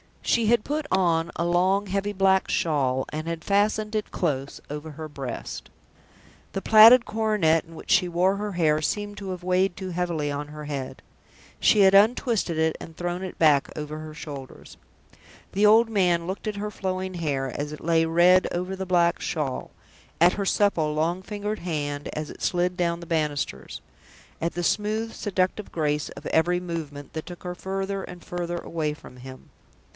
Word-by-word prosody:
She 230 -2 +2
had 235 -1 +3
put 295 0 -3
on 170 -3 +2
a - - -1
long, 185 +4 +2
heavy 200 +2 -1
black 190 -1 +3
shawl, 130 -5 +1
and 155 +2 -5
had 165 -1 -4
fastened 210 +2 +1
it 215 - -2
close 140 -5 -2
over 150 +2 -6
her 155 +1 -7
breast. 135 -5 -6 0.8
The 195 - -2
plaited 225 +4 +8
coronet 210 -8 +1
in 165 0 -14
which - - -7
she 180 - +4
wore 180 +3 +2
her 205 0 -4
hair 155 -3 +2
seemed 205 +5 -2
to 195 -1 -6
have 180 -1 -6
weighed 185 0 +1
too 190 -1 -6
heavily 170 -4 -2
on 145 +1 -4
her 150 0 -9
head. 140 -3 -5 0.6
She 210 - +5
had 190 0 +6
untwisted 210 - +3
it, 160 0 +1
and 165 - -10
thrown 175 +2 -3
it 185 - -6
back 150 -4 +4
over 150 0 -5
her 155 0 -8
shoulders. 140 -4 -9 0.7
The 205 +2 +2
old 225 +2 +6
man 180 -5 +2
looked 190 +5 -5
at 210 - -2
her 210 +1 -4
flowing 185 -1 -3
hair, 140 -6 -2
as 145 +1 -3
it 150 - -9
lay 165 0 +3
red 175 +3 +5
over 180 +2 -3
the 190 0 -5
black 175 -1 +3
shawl 150 -8 -3 0.5
at 175 +3 +6
her 200 - -2
supple, 170 -7 +2
long 165 +4 0
fingered 210 +2 -4
hand, 145 -4 -3
as 155 0 -4
it - - -13
slid 180 0 0
down 170 -1 0
the - - -8
banisters 150 - -2 0.6
at 170 +2 -2
the 175 - -3
smooth, 215 +4 0
seductive 190 0 -1
grace 150 -2 -1
of - - -11
every 175 +2 +2
movement 155 -5 -6
that 160 - -5
took 175 -1 -9
her 180 -1 -4
further 195 +1 -3
and 180 -1 -10
further 175 -1 -4
away 160 -3 -3
from 140 -4 -14
him. 130 +1 -11
175 Hz, 180 wpm, -25 LUFS, 155-195 Hz, 0.8 s, plaited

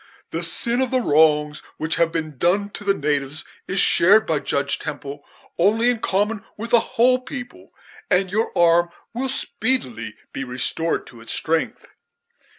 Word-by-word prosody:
The - - -2
sin 240 +1 0
of 260 - 0
the 255 - +2
wrongs 150 -1 +3 0.2
which 160 +1 -2
have 165 -1 +2
been 155 -5 -4
done 200 +4 +1
to 205 - -9
the 200 -1 +2
natives 145 0 -2 0.2
is 195 +1 -1
shared 205 +6 +5
by 155 -2 0
Judge 140 0 -1
Temple 145 0 -7 0.4
only 220 +7 +4
in 240 - -3
common 205 +2 0
with 230 +3 -6
a 235 - +8 0.2
whole 255 +2 +5
people, 250 -1 -9 0.4
and 185 0 +2
your 220 +3 0
arm 170 0 +4 0.2
will 260 +3 -2
speedily 215 - -2 0.2
be 135 - -4
restored 130 +6 -2
to 120 -2 -14
its 115 - -6
strength." 160 0 -2
175 Hz, 160 wpm, -22 LUFS, 150-225 Hz, 0.4 s, a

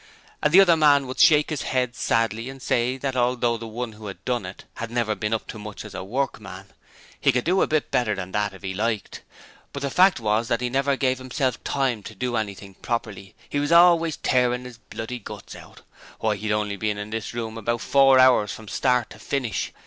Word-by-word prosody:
And 150 - +2
the 190 +4 +8
other 175 -3 +5
man 145 -3 +4
would 130 0 -7
shake 150 -1 +5
his 150 - -2
head 125 -2 -1
sadly 115 +1 0
and 135 0 -9
say 125 0 0
that 135 0 -3
although 120 -1 +1
the 115 0 -7
one 115 +1 -5
who 105 0 -10
had 95 -1 -9
done 120 -7 -1
it 95 - -10
had 115 - -4
never 115 -2 0
been 105 0 -3
up 115 - -1
to 110 - -7
much 105 0 -8
as 105 - -10
a 95 - -5
workman, 100 -4 -4 0.5
he - - +4
could 125 - 0
do 185 +3 +2
it - - +4
a - - -10
bit 155 -1 -1
better 110 -4 +1
than 95 -1 -6
that 105 0 0
if 95 - -14
he 95 -1 -3
liked, 110 +1 -2 0.5
but 140 - -6
the 140 - -2
fact 185 0 +4
was 110 +1 0
that 115 - 0
he 125 -1 -2
never 135 +1 +1
gave 130 -1 0
himself 130 -1 -2
time 130 -6 -1
to 110 +2 -10
do 125 +3 -2
anything 100 -3 -4
properly: 100 -3 -5
he 145 - -2
was 145 +2 -1
always 170 -2 +5
tearing 125 -1 +1
his 120 -2 -11
bloody 115 +2 -7
guts 105 - -10
out! - - -14 0.4
Why, 110 -1 0
he'd 105 +1 -3
only 105 -1 -1
been 105 0 -1
in 105 +1 -6
this 115 +1 -4
room 115 -2 -4
about 115 +1 -2
four 135 -1 +5
hours 130 -5 +5
from 110 - -9
start 125 +1 +1
to - - -12
finish! 130 -6 -2
120 Hz, 230 wpm, -24 LUFS, 105-130 Hz, 0.5 s, the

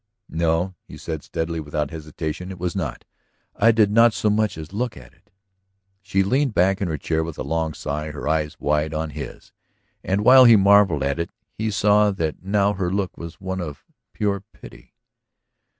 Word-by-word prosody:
"No," 85 +3 0
he - - -12
said 80 -3 -5
steadily, 80 +2 -3
without 75 -1 -3
hesitation. 80 +2 -5
"It 95 - -7
was 90 +1 -3
not. 80 -9 -4 0.5
I 115 +2 +5
did 110 -2 +3
not 115 +1 +5
so 105 - +1
much 105 -3 0
as 80 +3 -9
look 120 - -2
at 65 -1 -14
it." 95 +4 -31 0.7
She 95 0 +1
leaned 130 +4 +1
back 95 +3 +2
in 100 - 0
her 80 -3 -2
chair 80 +2 -1
with 80 -1 -7
a - - -3
long 80 -1 -2
sigh, 75 +2 -4
her 75 0 -6
eyes 75 -1 -1
wide 75 +1 0
on 80 0 -3
his. 75 +1 -8 0.5
And 100 +3 -1
while 130 +1 +9
he 115 -2 +8
marvelled 100 -5 +5
at 70 +3 -1
it, 85 - -2 0.2
he 110 +1 -2
saw 105 0 +3
that 80 -6 -3
now 100 +2 +1
her 95 -3 -2
look 95 -1 -2
was 85 0 -9
one 95 -1 -4
of 75 -5 -7 0.3
pure 100 -2 -1
pity. - - -15
90 Hz, 190 wpm, -22 LUFS, 80-100 Hz, 0.7 s, while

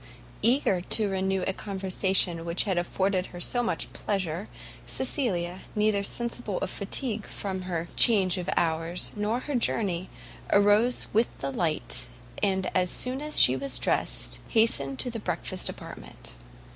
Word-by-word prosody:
Eager 230 -7 +3
to 205 +2 +1
renew 190 0 0
a 190 - -1
conversation 190 -3 0
which 170 +1 0
had 195 -3 -1
afforded 185 +1 -1
her 175 - -10
so 245 +7 +2
much 240 - -3
pleasure, 190 -2 -3 0.4
Cecilia, 190 - -1
neither 210 -1 +2
sensible 235 -2 -1
of - - -3
fatigue 215 +1 -2
from 190 -2 -4
her 170 -1 -2
change 195 -6 +5
of 175 - -4
hours 165 +1 -1
nor 215 +4 -1
her 295 - -4
journey, 195 -7 0 0.4
arose 205 +4 +4
with 225 +3 +3
the 140 - -3
light, 155 - 0 0.3
and 190 -1 +1
as 180 -1 +2
soon 255 +7 -1
as 300 0 +3
she 125 - +7
was 135 0 -3
dressed, - - -1
hastened 140 - +3
to 245 - -1
the 230 - -5
breakfast 185 -3 -1
apartment. - - -9
190 Hz, 145 wpm, -27 LUFS, 175-220 Hz, 0.4 s, she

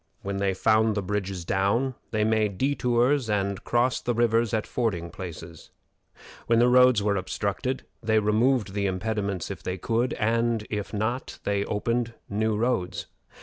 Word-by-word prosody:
When 100 0 -3
they 100 -1 0
found 110 +2 +3
the 100 - -1
bridges 95 -2 -3
down, 100 +9 +1 0.2
they 110 -1 0
made 110 -3 +1
detours 125 0 +1
and 100 -2 -1
crossed 120 +1 +1
the 120 - 0
rivers 115 -1 +2
at 110 -1 0
fording 90 -9 -2
places. 85 -4 -9 0.8
When 115 - +4
the 120 +1 +5
roads 125 -4 +5
were 100 -1 +1
obstructed, 100 +7 -2 0.2
they 110 -1 +2
removed 110 0 +2
the 100 -1 0
impediments 100 -1 -2
if - - -7
they 90 0 -3
could, 115 +6 0
and 115 0 0
if 105 -2 -3
not, 110 +5 -2
they 100 0 0
opened 115 +2 -1 0.2
new 110 +1 +1
roads. 115 -6 -1
110 Hz, 155 wpm, -26 LUFS, 100-120 Hz, 0.8 s, the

